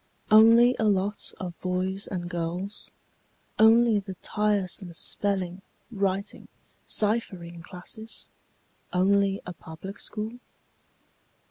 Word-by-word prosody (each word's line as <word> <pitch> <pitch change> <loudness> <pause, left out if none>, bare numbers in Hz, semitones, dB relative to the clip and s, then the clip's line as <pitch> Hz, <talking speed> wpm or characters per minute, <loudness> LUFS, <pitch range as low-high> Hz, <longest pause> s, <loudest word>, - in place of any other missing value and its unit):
Only 230 +3 +7
a 220 - +2
lot 200 0 +1
of 175 -2 -7
boys 185 +2 -1
and 175 -3 -4
girls? 175 +3 -4 0.7
Only 225 0 +6
the 190 -1 -8
tiresome 200 -4 -1
spelling, 190 -1 -1 0.3
writing, 200 -1 -2 0.4
ciphering 185 -6 -1
classes? 185 +6 -8 0.7
Only 195 +1 +2
a 180 - -6
public 175 +5 -10
school? 220 +3 -5
195 Hz, 95 wpm, -27 LUFS, 180-215 Hz, 0.7 s, Only